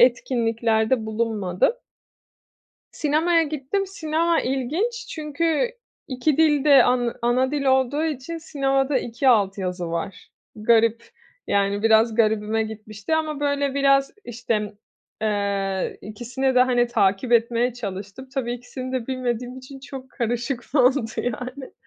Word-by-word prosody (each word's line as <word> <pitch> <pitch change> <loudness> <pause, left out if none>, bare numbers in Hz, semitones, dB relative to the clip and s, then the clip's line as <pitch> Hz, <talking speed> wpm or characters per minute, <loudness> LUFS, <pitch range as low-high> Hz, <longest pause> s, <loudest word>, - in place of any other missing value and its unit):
etkinliklerde 230 -2 +2
bulunmadım. 215 - 0 1.2
Sinemaya 325 +3 +2
gittim. 310 +6 -2
Sinema 330 -2 0
ilginç 335 - -2
çünkü 320 +7 -1 0.4
2 265 +3 0
dil 300 -3 +4
de 280 -2 +7
an 245 -1 +1
ana 250 +2 +2
dil 295 -1 -1
olduğu 265 +3 +2
için 310 +2 -4
sinemada 275 -3 0
2 240 +3 -2
alt 205 -6 +4
yazı 180 -3 -3
var. 170 +3 -5 0.3
Garip. 230 +1 +3 0.4
Yani, 200 +1 +1
biraz 225 0 +4
garibime 220 -1 +1
gitmişti 215 +5 -4
ama, 310 -2 -2
böyle, 285 -1 0
biraz, 275 -1 +3
işte, 225 -3 -2 0.5
eee, 200 -3 -1
ikisini 250 +5 -2
de, 250 - +6
hani, 245 -1 +2
takip 200 +1 +1
etmeye 235 +1 +2
çalıştım. 205 +2 -7
Tabii 245 -3 -2
ikisini 250 +1 -7
de 255 -3 -3
bilmediğim 250 -1 -3
için 265 +1 -11
çok 265 -1 -9
karışık 240 +1 -3
oldu, 255 -2 +4
yani. 250 +3 -4
245 Hz, 125 wpm, -23 LUFS, 220-275 Hz, 1.2 s, de